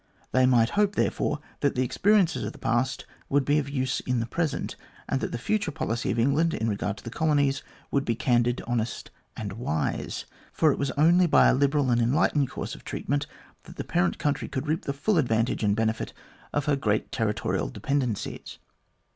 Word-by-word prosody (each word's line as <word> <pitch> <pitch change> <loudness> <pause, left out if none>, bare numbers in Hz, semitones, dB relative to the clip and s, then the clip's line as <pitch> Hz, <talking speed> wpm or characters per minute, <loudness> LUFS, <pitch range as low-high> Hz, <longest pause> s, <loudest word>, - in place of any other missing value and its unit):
They 130 0 +4
might 120 -3 +4
hope, 205 0 +2
therefore, 150 0 0 0.2
that 140 - +1
the 130 - +2
ex 125 - -4
periences 185 - +3
of 105 - -4
the - - -13
past 130 +3 0 0.2
would 140 -1 +2
be 145 +1 +3
of 140 -1 -3
use 130 -2 -1
in 125 -1 -1
the 115 - -1
present, 155 +4 -2 0.3
and 135 - -1
that - - -2
the - - -2
future 205 - 0
policy 120 -5 -2
of - - 0
England 140 +8 +2
in 110 - -1
regard 105 -1 -2
to - - -12
the 115 - -6
colonies 145 -2 +1 0.3
would 140 - +1
be 115 - 0
candid, 120 0 +1
honest, 120 -2 -2 0.3
and 100 -3 -4
wise; 80 -9 -2 0.3
for 155 -2 +3
it - - -3
was 140 - 0
only 175 +4 +5
by - - +6
a - - +4
liberal 140 0 +2
and 120 0 +3
enlightened 140 +2 +2
course - - -5
of - - -11
treatment 145 +1 -2 0.4
that - - -12
the - - -4
parent 90 -2 +1
country 145 -1 -1
could 130 +2 -4
reap 155 +2 -1
the 140 - -1
full 165 +7 +1
advantage 115 -4 +1
and 100 -1 +3
benefit 110 0 -1 0.4
of 145 -1 -1
her 150 - +2
great 110 -6 0
territorial 105 -2 -1
dependencies. 130 -7 -3
130 Hz, 200 wpm, -27 LUFS, 115-150 Hz, 0.4 s, by